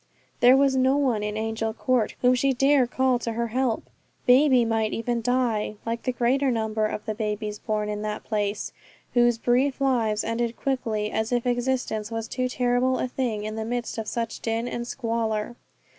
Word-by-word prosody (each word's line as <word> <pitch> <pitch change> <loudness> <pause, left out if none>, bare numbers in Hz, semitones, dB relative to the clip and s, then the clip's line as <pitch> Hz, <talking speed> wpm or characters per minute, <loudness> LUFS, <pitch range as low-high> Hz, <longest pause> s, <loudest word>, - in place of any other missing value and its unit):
There 250 +2 +7
was 275 -1 +3
no 260 +1 +3
one 255 -7 +1
in 210 0 -3
Angel 220 0 -2
Court 250 -4 0
whom 250 0 +6
she 270 +2 +2
dare 270 0 +3
call 260 0 +1
to 230 -1 -3
her 235 +1 -2
help. 250 -1 0 0.4
Baby 255 -1 +5
might 225 -1 0
even 235 +1 -1
die, 235 -3 0
like 230 0 -2
the 255 - -1
greater 255 +3 +1
number 220 -2 0
of 210 - -5
the 220 - -2
babies 210 -1 -3
born 215 -1 -2
in 210 0 -3
that 210 0 -4
place, 210 -1 -2 0.4
whose 240 -1 +4
brief 255 +4 +1
lives 230 -6 +1
ended 230 +1 -1
quickly, 225 -6 -1
as 220 +1 -1
if 245 0 0
existence 245 -3 -1
was 225 -1 -4
too 255 0 -2
terrible 250 +1 +1
a - - -1
thing 245 -5 -2
in 215 0 -4
the 220 - -3
midst 240 0 -3
of 220 - -5
such 230 0 -3
din 225 +1 -2
and 240 -1 -4
squalor. 230 -3 -2
235 Hz, 190 wpm, -25 LUFS, 220-255 Hz, 0.4 s, There